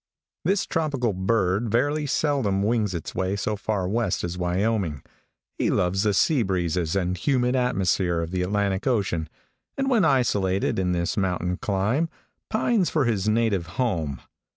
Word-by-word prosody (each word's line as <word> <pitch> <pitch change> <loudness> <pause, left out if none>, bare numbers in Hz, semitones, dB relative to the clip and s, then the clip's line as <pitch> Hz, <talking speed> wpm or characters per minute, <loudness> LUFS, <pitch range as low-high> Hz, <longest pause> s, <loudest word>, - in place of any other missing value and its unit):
|THIS 195 +3 +2
tropical 140 -9 -1
bird 95 +2 +1
very 145 +6 +1
seldom 130 -10 +1
wings 105 -2 +1
his 85 -3 -5
way 95 +1 -1
so 105 +1 -1
far 100 -2 -2
west 105 -1 0
as 85 0 -3
Wyoming. 90 -3 -1 0.6
He - - +2
loves 90 +2 +1
the 105 -1 +1
sea 145 - +3
breezes 90 -4 -1
and 90 -1 0
humid 125 - +1
atmosphere 95 -8 +1
of 85 0 -3
the 90 -1 -1
Atlantic 100 +3 0
ocean, 95 -10 0 0.5
and 270 0 0
when 230 -6 +4
isolated 100 -11 +1
in 90 -1 +1
this 85 +3 -1
mountain 90 -2 0
clime, 105 - 0 0.4
pines 220 -4 +1
for 150 -4 +1
his 110 -3 0
native 110 -6 +1
home. 80 - -1
100 Hz, 150 wpm, -25 LUFS, 90-125 Hz, 0.6 s, when